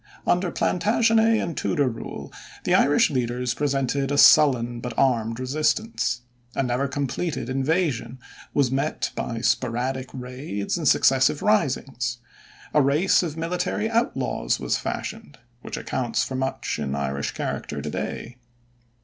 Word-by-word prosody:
Under 180 Hz, 0 st, +2 dB
Plantagenet 225 Hz, +5 st, +2 dB
and 170 Hz, -, -3 dB
Tudor 145 Hz, -5 st, +1 dB
rule, 115 Hz, -2 st, -6 dB, 0.3 s
the -, -, +1 dB
Irish 145 Hz, +1 st, +4 dB
leaders 125 Hz, -1 st, -1 dB
presented 135 Hz, -1 st, 0 dB
a 145 Hz, -, +1 dB
sullen 120 Hz, -6 st, +6 dB
but 120 Hz, -1 st, -6 dB
armed 115 Hz, -3 st, +1 dB
resistance. 135 Hz, -, 0 dB, 0.3 s
A -, -, +1 dB
never 125 Hz, +2 st, 0 dB
completed 140 Hz, 0 st, -3 dB
invasion 135 Hz, -1 st, 0 dB, 0.3 s
was 140 Hz, -4 st, +2 dB
met 135 Hz, +3 st, -1 dB
by 115 Hz, -1 st, -3 dB
sporadic 130 Hz, +2 st, 0 dB
raids 125 Hz, -5 st, -4 dB
and 165 Hz, -4 st, -1 dB
successive 130 Hz, +3 st, +4 dB
risings. 130 Hz, -, 0 dB, 0.6 s
A 150 Hz, -, +5 dB
race 145 Hz, +7 st, +3 dB
of 165 Hz, -3 st, -4 dB
military 180 Hz, +6 st, -1 dB
outlaws 225 Hz, -, 0 dB
was -, -, 0 dB
fashioned, 75 Hz, -, -5 dB, 0.2 s
which -, -, -6 dB
accounts 120 Hz, -3 st, -1 dB
for -, -, -5 dB
much 130 Hz, -10 st, -2 dB
in 70 Hz, -2 st, -2 dB
Irish 70 Hz, 0 st, -2 dB
character -, -, -4 dB
today. 125 Hz, +1 st, -5 dB
135 Hz, 130 wpm, -24 LUFS, 125-155 Hz, 0.6 s, sullen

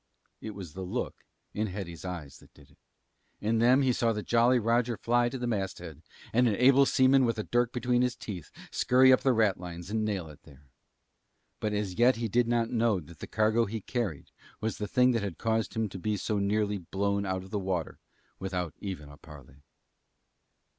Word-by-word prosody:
It 110 Hz, -, -7 dB
was 90 Hz, -7 st, -8 dB
the 95 Hz, -, -7 dB
look 90 Hz, -, -4 dB, 0.3 s
in 110 Hz, +1 st, -1 dB
Hetty's 90 Hz, -4 st, -7 dB
eyes 85 Hz, -7 st, -7 dB
that -, -, -20 dB
did 70 Hz, -2 st, -19 dB
it. -, -, -25 dB, 0.6 s
In 110 Hz, +2 st, 0 dB
them 125 Hz, +4 st, +5 dB
he 130 Hz, -2 st, +3 dB
saw 115 Hz, -1 st, +1 dB
the 105 Hz, -1 st, -4 dB
Jolly 120 Hz, +2 st, +4 dB
Roger 115 Hz, 0 st, +1 dB
fly 120 Hz, +1 st, +2 dB
to 130 Hz, -, -5 dB
the 125 Hz, -, -3 dB
masthead 95 Hz, -, -4 dB, 0.3 s
and 125 Hz, +2 st, +4 dB
an 105 Hz, -, +2 dB
able 135 Hz, +4 st, +5 dB
seaman 130 Hz, +1 st, +4 dB
with 115 Hz, -2 st, +1 dB
a 110 Hz, -, -2 dB
dirk 120 Hz, +1 st, +1 dB
between 125 Hz, 0 st, +1 dB
his 125 Hz, -1 st, +1 dB
teeth 90 Hz, -7 st, -7 dB, 0.2 s
scurry 130 Hz, +1 st, +5 dB
up -, -, +5 dB
the 135 Hz, -, +3 dB
ratlines 90 Hz, -5 st, -1 dB
and 110 Hz, 0 st, 0 dB
nail 100 Hz, -6 st, -2 dB
it 75 Hz, -, -14 dB
there. 70 Hz, -2 st, -19 dB, 0.9 s
But 105 Hz, -1 st, -2 dB
as 105 Hz, -2 st, -3 dB
yet 125 Hz, +2 st, +5 dB
he 115 Hz, 0 st, -2 dB
did 120 Hz, +3 st, +2 dB
not 115 Hz, -1 st, +1 dB
know 115 Hz, -4 st, +2 dB
that 85 Hz, -1 st, -14 dB
the -, -, -7 dB
cargo 110 Hz, +2 st, +2 dB
he 110 Hz, +2 st, -4 dB
carried 105 Hz, -, -4 dB, 0.3 s
was 110 Hz, 0 st, -3 dB
the 105 Hz, -, -2 dB
thing 125 Hz, +1 st, +4 dB
that 115 Hz, -3 st, 0 dB
had 100 Hz, -4 st, -4 dB
caused 110 Hz, -3 st, -1 dB
him 110 Hz, -1 st, 0 dB
to 95 Hz, -, -8 dB
be 105 Hz, +3 st, -1 dB
so 105 Hz, +2 st, -1 dB
nearly 105 Hz, 0 st, 0 dB
blown 100 Hz, +3 st, -1 dB
out 95 Hz, -1 st, -2 dB
of 95 Hz, -, -14 dB
the 105 Hz, -, -1 dB
water 95 Hz, -4 st, -3 dB, 0.4 s
without 90 Hz, -4 st, -3 dB
even 95 Hz, -7 st, -6 dB
a 75 Hz, 0 st, -13 dB
parley. 70 Hz, -3 st, -15 dB
105 Hz, 205 wpm, -29 LUFS, 95-120 Hz, 0.9 s, them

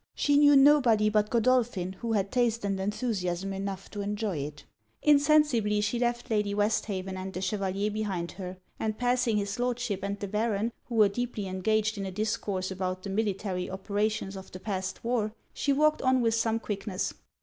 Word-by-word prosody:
She 290 Hz, -, +2 dB
knew 290 Hz, 0 st, +7 dB
nobody 265 Hz, -7 st, +5 dB
but 210 Hz, 0 st, +2 dB
Godolphin 230 Hz, -6 st, +1 dB
who 225 Hz, +4 st, -3 dB
had 200 Hz, -2 st, 0 dB
taste 235 Hz, -3 st, +1 dB
and 195 Hz, -1 st, -1 dB
enthusiasm 195 Hz, -3 st, -2 dB
enough 195 Hz, 0 st, -4 dB
to 205 Hz, -, -4 dB
enjoy 205 Hz, -2 st, -2 dB
it. 145 Hz, +1 st, -6 dB, 0.4 s
Insensibly 285 Hz, -8 st, +4 dB
she 210 Hz, +3 st, 0 dB
left 240 Hz, -1 st, -1 dB
Lady 210 Hz, -2 st, +1 dB
Westhaven 205 Hz, -2 st, -1 dB
and 185 Hz, +1 st, -5 dB
the 185 Hz, -, -5 dB
Chevalier 195 Hz, +1 st, -1 dB
behind 195 Hz, -5 st, -2 dB
her; 185 Hz, -1 st, -7 dB, 0.2 s
and 215 Hz, -1 st, -2 dB
passing 245 Hz, -2 st, +1 dB
his 200 Hz, +3 st, -2 dB
Lordship 245 Hz, -4 st, -1 dB
and 200 Hz, +1 st, -3 dB
the 200 Hz, -, -4 dB
Baron, 215 Hz, +2 st, 0 dB
who 240 Hz, -, -6 dB
were 215 Hz, -2 st, +6 dB
deeply 225 Hz, 0 st, -3 dB
engaged 210 Hz, +3 st, 0 dB
in 195 Hz, -, -3 dB
a -, -, -5 dB
discourse 195 Hz, -2 st, -2 dB
about 185 Hz, 0 st, -3 dB
the 195 Hz, -, -4 dB
military 195 Hz, -3 st, -1 dB
operations 200 Hz, +1 st, -2 dB
of 190 Hz, 0 st, -9 dB
the 185 Hz, -, -8 dB
past 190 Hz, -1 st, -4 dB
war, 230 Hz, -2 st, -1 dB, 0.2 s
she 285 Hz, -, 0 dB
walked 305 Hz, +2 st, +3 dB
on 260 Hz, 0 st, +3 dB
with 230 Hz, -1 st, +2 dB
some 225 Hz, 0 st, +1 dB
quickness. 200 Hz, -3 st, -3 dB
210 Hz, 180 wpm, -28 LUFS, 195-235 Hz, 0.4 s, knew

